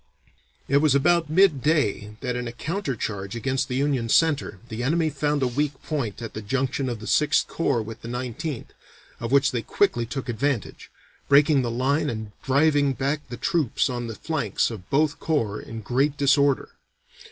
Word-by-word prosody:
It 140 - +3
was 145 -1 +4
about 165 +2 +3
midday 150 - +2
that 125 -2 -2
in 125 0 -3
a - - -4
counter 150 +3 -3
charge 100 -2 -4
against 130 +3 -1
the 125 - -3
Union 135 -4 0
center, 145 - +2
the 115 0 -5
enemy 160 +4 +1
found 145 0 0
a - - +3
weak 145 +4 -1
point 120 -8 -3
at 115 - -6
the 110 - -5
junction 130 +4 -1
of 120 -2 -4
the 110 - -9
Sixth 150 +4 +3
Corps 135 -8 0
with 110 +1 -9
the - - -8
Nineteenth, 125 +3 -5 0.5
of 115 0 -4
which 140 0 +4
they 120 - -1
quickly 120 - +1
took 135 +1 -5
advantage, 120 -1 -2 0.4
breaking 140 0 +5
the 120 - -2
line 140 +6 +1
and 110 -2 -5
driving 145 0 +3
back 140 +3 -2
the 120 - -6
troops 155 -7 0
on 120 -1 -3
the 115 - -6
flanks 140 -9 -1
of 100 -4 -9
both 150 +1 +1
corps 115 -10 -1
in 115 0 -8
great 135 +7 0
disorder. 140 -1 +3
135 Hz, 180 wpm, -24 LUFS, 120-150 Hz, 0.5 s, breaking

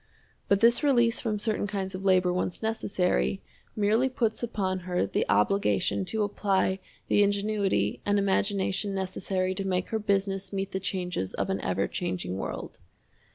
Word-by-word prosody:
But 200 0 +3
this 235 +1 +5
release 240 -5 +3
from 215 -3 -1
certain 210 -1 -1
kinds 195 -1 -3
of 185 +1 -5
labor 185 -2 +3
once 180 +2 -2
necessary, 180 - 0 0.4
merely 220 +5 +2
puts 230 -4 -1
upon 195 -5 -1
her 180 - -1
the 100 - -1
obligation 195 - +2
to 215 +3 0
apply 195 -2 0 0.3
the - - +4
ingenuity 200 - +1
and 205 0 +2
imagination 195 0 0
necessary 185 0 -1
to 195 - -3
make 185 -1 -1
her 220 - -1
business 195 -2 0
meet 195 -1 -3
the 190 - -2
changes 180 - -3
of - - -1
an - - -2
ever - - 0
changing 90 +1 -3
world. - - -6
195 Hz, 155 wpm, -28 LUFS, 185-210 Hz, 0.4 s, this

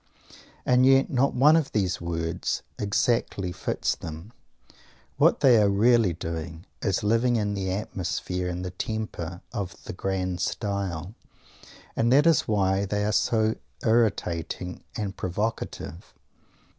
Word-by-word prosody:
And 125 0 +4
yet 135 +1 +5
not 135 +1 +2
one 145 +5 +6
of 160 -4 0
these 95 -4 0
words 85 -1 -2 0.2
exactly 100 -2 0
fits - - -1
them. 80 +8 -9 0.8
What - - +4
they 120 -5 +6
are 100 - +4
really 110 0 +4
doing 85 +1 -6 0.2
is 100 -2 0
living 115 +3 +2
in 105 -2 0
the 95 -2 -2
atmosphere 90 -2 -3
and 90 +1 -4
the 90 - -4
temper 90 -4 -4
of 100 -5 -4
"the - - -6
grand 95 -1 -2
style" 100 -2 -3 0.8
and 115 +1 +2
that 145 +4 +5
is 165 -3 +4
why 100 -2 +2
they 105 +1 -1
are 105 - +1
so 110 -1 +2 0.3
irritating 90 -6 0
and 100 -3 -3
provocative! 95 -3 -4
100 Hz, 130 wpm, -26 LUFS, 90-115 Hz, 0.8 s, one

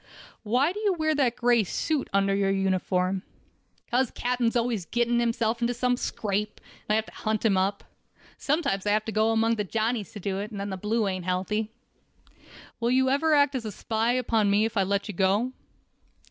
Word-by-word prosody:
"Why 250 +9 +2
do 415 - -6
you 415 -3 +2
wear 315 -1 +1
that 265 -5 +1
gray 240 -2 +3
suit 295 - -2
under 195 0 +2
your 195 0 +1
uniform?" 190 -1 0 0.6
"Because 250 0 +1
captain's 245 -1 -1
always 230 -6 0
getting 240 0 +1
himself 235 0 0
into 240 +1 0
some 250 +1 +1
scrape, 210 -3 -3 0.3
and - - +3
I - - +4
have 220 0 +1
to - - -14
hunt 215 0 -2
him 205 -3 +4
up. 195 +2 0 0.5
Sometimes 275 - -1
I 205 - +3
have 215 0 +1
to 220 - -3
go 215 +1 +2
among 225 +1 +2
the 210 - 0
Johnnies 220 +1 -2
to 210 - -7
do 195 0 -2
it, 205 +1 -4
and 210 -3 -7
then 200 0 -4
the - - -2
blue 210 +3 0
ain't 185 -2 -3
healthy." 195 +4 -1 1.1
"Will 235 0 0
you 260 +1 +3
ever 310 +3 +3
act 285 -1 +4
as 225 -6 -4
spy 225 +2 0
upon 225 -4 +1
me 205 +2 +3
if 225 - -4
I 200 - +3
let 200 +2 0
you 210 - -5
go?" 195 +7 +1
220 Hz, 200 wpm, -26 LUFS, 200-245 Hz, 1.1 s, I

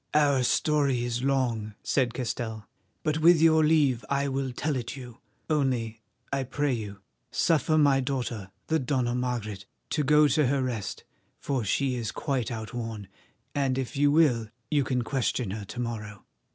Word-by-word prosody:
"Our 145 -3 +4
story 140 0 +2
is 120 0 -2
long," 120 -6 0
said 125 -3 +1
Castell, 115 -4 -4 0.4
"but 155 0 0
with 165 +1 +6
your 160 0 +5
leave 145 -7 +3
I 140 0 +1
will 135 -1 -2
tell 145 +4 -2
it 120 -1 -4
you, 125 -2 -10 0.3
only, 125 -7 0 0.3
I 135 - +1
pray 145 +2 -1
you, 105 -4 -5 0.3
suffer 160 -1 +2
my 140 -3 +5
daughter, 125 -7 -3 0.2
the 160 0 +1
Dona 125 -2 0
Margaret, 115 -5 -3 0.2
to 150 - +1
go 150 +1 +5
to 150 +3 +3
rest, 130 -5 -1 0.4
for 135 -4 -1
she 130 +6 +1
is 115 -2 -3
quite 135 -6 -2
outworn, 110 -3 -5 0.4
and 135 -3 0
if 135 +2 -3
you 145 +1 +4
will 130 -8 +3 0.2
you 145 -2 +3
can 125 -2 -1
question 125 -4 -1
her 105 0 -5
to 120 - -8
morrow." 110 -4 -5
130 Hz, 160 wpm, -27 LUFS, 115-145 Hz, 0.4 s, with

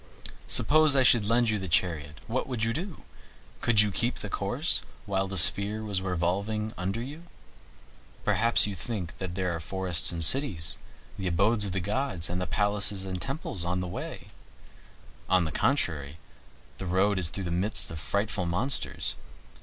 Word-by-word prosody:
Suppose 155 -1 +5
I 135 - +4
should 120 -4 +5
lend 115 0 +2
you 105 - -1
the 95 - -5
chariot, 80 -3 -1
what 125 +3 -2
would 125 -4 -3
you 115 0 0
do? 175 - -6 0.6
Could 110 -3 +4
you 105 -1 +1
keep 120 +5 -1
your - - -6
course - - +2 0.2
while 95 -1 -1
the 95 0 -2
sphere 100 +6 +7
was 100 -3 -2
revolving 95 +4 -2
under 95 +6 -3
you? 145 +6 -9 1.0
Perhaps 115 0 +3
you 105 - -4
think 95 -1 -5
that 90 -2 -5
there 90 -2 -1
are - - -5
forests 90 0 -1
and 85 -1 -3
cities, 100 - -1 0.4
the 95 - -2
abodes 100 +5 +4
of 95 0 -2
gods, 105 -5 -2
and 90 -1 -3
palaces 100 -1 0
and 90 -1 -5
temples 135 - -4
on 90 +1 -2
the 90 - -3
way. 85 - -7 1.0
On 90 -2 +3
the 80 - -4
contrary, 80 - -1 0.6
the 95 - -5
road 95 +2 +1
is 85 -3 +1
through 95 +3 -5
the 85 - -4
midst 95 +3 0
of 80 - -6
frightful 100 +4 -1
monsters. 115 +11 0
95 Hz, 170 wpm, -27 LUFS, 90-110 Hz, 1.0 s, sphere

